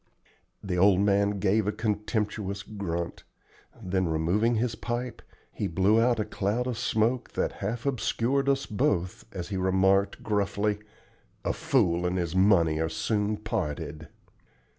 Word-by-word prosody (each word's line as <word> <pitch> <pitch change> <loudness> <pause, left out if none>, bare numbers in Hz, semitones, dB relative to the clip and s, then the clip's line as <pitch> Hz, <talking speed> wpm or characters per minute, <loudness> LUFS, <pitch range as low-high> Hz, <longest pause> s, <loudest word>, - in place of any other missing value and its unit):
The 90 -3 -1
old 95 0 +5
man 100 0 +2
gave 100 +2 +2
a - - +2
contemptuous 105 -2 -2
grunt; 85 -5 -4 0.6
then, 95 0 -1
removing 90 +9 +1
his 115 +1 0
pipe, 120 +1 -4 0.3
he - - -2
blew 95 +6 +3
out 120 -1 +2
a 105 - 0
cloud 105 +3 -1
of 125 -2 -2
smoke 115 +3 0
that - - 0
half 115 +5 -3
obscured 135 +1 0
us 135 0 +1
both 105 - -1
as 90 -4 -6
he 100 - -2
remarked, 95 +1 +2
gruffly, 105 0 0 0.7
"'A - - +1
fool 100 - +1
and 90 +1 -1
his 85 -1 -2
money 85 -5 +4
are 80 0 0
soon 105 +4 -1
parted.'" 80 -8 -4
100 Hz, 140 wpm, -28 LUFS, 95-110 Hz, 0.7 s, old